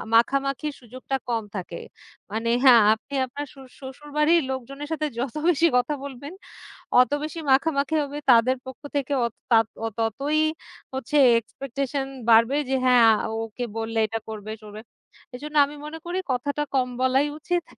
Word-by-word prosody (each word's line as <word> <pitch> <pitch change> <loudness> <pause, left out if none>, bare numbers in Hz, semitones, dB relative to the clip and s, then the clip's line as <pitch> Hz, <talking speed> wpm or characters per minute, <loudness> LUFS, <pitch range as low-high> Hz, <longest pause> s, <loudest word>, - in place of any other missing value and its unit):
মাখামাখির 275 +5 +1
সুযোগটা 255 +3 -5
কম 230 -2 0
থাকে। 175 -3 -5 0.5
মানে 225 +2 -2 0.2
হ্যাঁ। 245 -3 +8
আপনি 220 +6 -10
আপনার 285 +3 -6
শসু 270 -1 -13
শ্বশুরবাড়ির 295 +5 +1
লোকজনের 275 +3 -6
সাথে 315 -1 -1
যত 260 +2 -3
বেশি 335 0 +4
কথা 250 +4 +1
বলবেন, 280 +3 -8 0.7
অত 250 - +4
বেশি 310 +2 -5
মাখামাখি 280 +1 +2
হবে। 285 0 -5
তাদের 245 +2 +5
পক্ষ 260 - -9 0.2
থেকে 285 0 -1
অত 230 - -7 0.2
তাত 225 -1 +5 0.2
অত 225 - -7
ততই 275 +8 0 0.5
হচ্ছে 265 +3 -3 0.2
expectation 275 +3 -4 0.2
বাড়বে 230 +4 +5
যে 265 - 0
হ্যাঁ। 250 -1 +6 0.2
আ - - -1 0.2
ওকে 225 +2 -5
বললে 225 0 -3
এটা 225 +1 -3
করবে 215 -1 -6
টরবে। 210 0 -10 0.5
এজন্য 300 +4 -7
আমি 295 - -10
মনে 305 +2 -7
করি 350 +2 -2
কথাটা 285 +4 -2
কম 255 -2 +2
বলাই 260 +2 +3
উচিত। 350 +3 -1
265 Hz, 155 wpm, -24 LUFS, 230-290 Hz, 0.7 s, হ্যাঁ